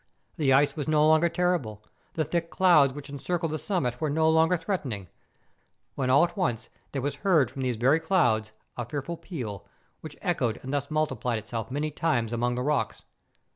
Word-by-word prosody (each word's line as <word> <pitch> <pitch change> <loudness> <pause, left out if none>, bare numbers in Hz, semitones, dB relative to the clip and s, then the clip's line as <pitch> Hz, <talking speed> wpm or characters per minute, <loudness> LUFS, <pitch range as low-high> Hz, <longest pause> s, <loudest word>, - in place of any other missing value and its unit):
The 145 -4 +2
ice 140 +2 +4
was 150 -2 -4
no 155 0 +4
longer 160 +2 +4
terrible; 160 -14 -1 0.3
the 160 - +1
thick 170 +2 -2
clouds 170 -8 +5
which 140 +1 -9
encircled 165 +3 -2
the 155 - -1
sum¬ 185 0 -1
mit 125 0 -3
were 155 - 0
no 160 +2 +2
longer 160 +2 +4
threatening, 135 - -4 0.8
when 130 -2 -2
all 140 +5 +6
at 175 - -1
once 125 - -1 0.2
there 135 -3 -3
was 145 0 -2
heard 170 -8 +3
from 135 - -6
these 125 -3 -1
very 135 +7 +3
clouds 120 - +1 0.3
a 120 - -2
fearful 140 +7 -4
peal, 130 - -7 0.3
which 155 -2 -10
echoed 125 - 0
and 135 +2 -5
thus 140 -1 -1
multiplied 155 -6 -1
itself 110 +1 -5
many 150 +3 -2
times 120 -8 0
among 120 +1 0
the 125 - -2
rocks. 150 0 -1
145 Hz, 190 wpm, -27 LUFS, 125-160 Hz, 0.8 s, all